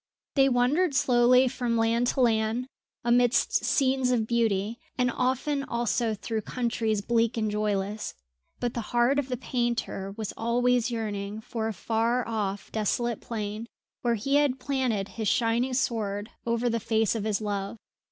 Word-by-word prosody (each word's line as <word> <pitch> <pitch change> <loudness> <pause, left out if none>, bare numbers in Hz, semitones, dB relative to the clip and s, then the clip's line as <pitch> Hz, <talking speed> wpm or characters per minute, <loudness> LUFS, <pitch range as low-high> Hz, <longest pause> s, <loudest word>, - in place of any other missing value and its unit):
They 270 -1 +4
wandered 270 +6 +2
slowly 250 0 +5
from 245 -2 -1
land 230 +2 +2
to 260 - +1
land, 225 +1 +2 0.4
amidst 245 +1 +3
scenes 265 -2 +2
of 240 -3 +2
beauty, 225 -1 0 0.2
and 250 -1 +2
often 265 +3 0
also 235 -2 0
through 220 +2 -3
countries 225 -2 -1
bleak 230 +1 +1
and 215 -2 0
joyless; 210 0 -2 0.4
but 245 -1 -1
the 235 - -2 0.2
heart 250 +4 +4
of 280 - -2
the 250 - -2
painter 235 -6 -2
was 220 -2 -4
always 245 +1 +1
yearning 210 -3 -3
for 220 0 -4
a 225 - -2
far 230 +5 0
off 205 -3 -3
desolate 225 +2 -1
plain 215 0 -4 0.3
where 235 -1 +1
he 275 +7 +1
had 285 -3 +2
planted 250 -7 -1
his 220 0 -4
shining 240 +4 +1
sword 215 -4 -1 0.2
over 235 +1 +1
the 230 -1 +1
face 220 -1 +1
of 225 -3 -3
his 210 -2 0
love. 205 0 -3
235 Hz, 155 wpm, -27 LUFS, 215-250 Hz, 0.4 s, slowly